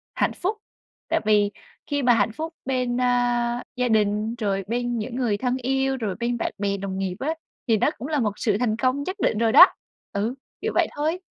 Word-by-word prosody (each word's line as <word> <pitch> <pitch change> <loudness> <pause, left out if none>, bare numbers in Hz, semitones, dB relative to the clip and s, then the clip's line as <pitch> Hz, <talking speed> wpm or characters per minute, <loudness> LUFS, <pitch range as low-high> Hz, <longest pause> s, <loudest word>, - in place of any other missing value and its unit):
hạnh - - +1
phúc. 395 +4 -2 0.5
Tại - - +2
vì 210 -1 +3 0.4
khi 285 -1 -1
mà 245 -1 +6
hạnh 220 -1 +2
phúc 320 +8 -5
bên, 250 -2 0
a, 245 -1 +1
gia 250 0 +1
đình, 215 0 +1
rồi 200 -4 -1
bên 240 +1 -1
những 235 +3 -5
người 240 -5 0
thân 250 +2 0
yêu, 265 +1 0
rồi 215 -6 -2
bên 240 0 -1
bạn - - -2
bè 200 0 -1
đồng 195 -1 -4
nghiệp 190 -2 -2
á, 305 +4 -1 0.3
thì 225 -2 +4
nó - - +3
cũng 240 +6 -6
là 300 -2 0
một 215 -4 +1
sự 210 -4 +1
thành 235 -3 +1
công 255 +3 +1
nhất 370 +5 -4
định 215 - +1
rồi 230 0 +2
đó. 360 - +10 0.5
Ừ, 215 +6 -1 0.3
kiểu - - -1
vậy - - +4
thôi. 310 +4 -1
240 Hz, 215 wpm, -24 LUFS, 215-260 Hz, 0.5 s, đó